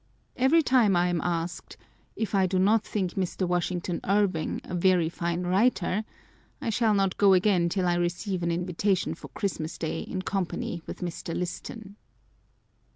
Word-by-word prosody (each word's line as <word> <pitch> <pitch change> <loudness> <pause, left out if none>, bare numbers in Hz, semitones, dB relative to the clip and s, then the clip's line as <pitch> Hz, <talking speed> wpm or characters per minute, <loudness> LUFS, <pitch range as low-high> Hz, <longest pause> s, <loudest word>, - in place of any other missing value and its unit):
Every 285 +6 +4
time 240 -8 +4
I 175 +1 +3
am 175 -2 0
asked, 170 -8 -3 0.2
" - - -35
If 220 -1 -3
I 190 -2 +3
do 185 +1 0
not 205 +4 +4
think 190 -4 -2
Mr. 185 0 -1
Washington 175 0 -1
Irving 195 -5 +1
a - - -8
very 175 -2 +3
fine 170 +1 -2
writer 195 +1 +1 0.3
?" - - -34
I 225 - -2
shall 225 -2 +2
not 195 -2 +1
go 200 -2 +6
again 185 -2 +3
till 185 0 0
I 175 - +3
receive 175 +2 -1
an 170 - 0
invitation 180 +3 0
for - - -10
Christmas 175 -6 -4
Day 160 - -3
in 185 -1 -4
company 190 -3 -3
with - - -7
Mr. 170 -1 -4
Liston. 200 +3 -6
185 Hz, 170 wpm, -27 LUFS, 175-200 Hz, 0.3 s, go